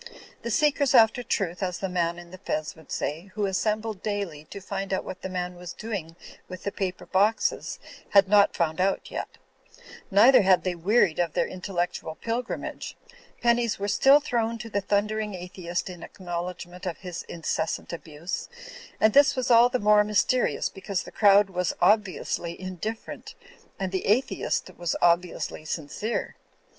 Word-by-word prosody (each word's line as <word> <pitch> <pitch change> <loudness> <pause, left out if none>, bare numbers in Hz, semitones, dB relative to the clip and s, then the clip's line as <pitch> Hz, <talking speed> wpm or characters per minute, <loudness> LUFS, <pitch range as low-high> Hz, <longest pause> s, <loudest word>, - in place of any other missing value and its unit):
The 235 - -4
seekers 285 +2 +2
after 225 +2 +6
truth 185 -7 -2
(as 180 -2 -1
the 195 - -3
man 170 -2 -1
in 175 0 -11
the 185 - -10
fez 155 -5 -3
would 160 -2 -16
say) 160 +5 -3
who 210 -2 0
assembled 215 +1 -1
daily 200 -8 -3
to 200 - -9
find 195 0 -5
out 190 - 0
what 185 - -8
the 190 - -5
man 180 -1 -3
was 175 -1 -8
doing 195 -7 -5 0.3
with 185 -1 -8
the 200 - -2
paper 185 -2 -4
boxes, 205 +4 +1 0.3
had 200 -1 +6
not 205 0 +5
found 165 0 0
out 195 +1 0
yet; - - -5 0.7
neither 230 +6 +7
had 185 -2 +4
they 185 - 0
wearied 180 0 +2
of 170 -3 0
their - - +1
intellectual 180 -3 -3
pilgrimage. 235 +5 -4 0.5
Pennies 235 -1 +2
were 200 - -3
still 270 +8 +6
thrown 230 -5 -1
to 230 -1 -8
the 200 - 0
thundering 210 +1 -1
atheist 175 -1 -4
in 180 -2 -8
acknowledgment 180 0 -6
of 170 - -3
his 180 -3 -6
incessant 165 0 -3
abuse; 170 +1 -6 0.5
and 215 -1 +4
this 280 0 +6
was 255 -1 -1
all 235 +1 +7
the 255 - 0
more 210 -1 +5
mys 210 0 +2
terious 255 -1 0
because 195 -1 -3
the - - -11
crowd 200 -1 +5
was 180 -1 -1
obviously 185 -3 +1
indifferent, 185 +4 -6 0.4
and 190 -1 -2
the 190 - -2
atheist 235 +7 0
was 175 -1 -1
obviously 175 -2 +1
sincere. 160 +9 -3
190 Hz, 165 wpm, -26 LUFS, 175-215 Hz, 0.7 s, neither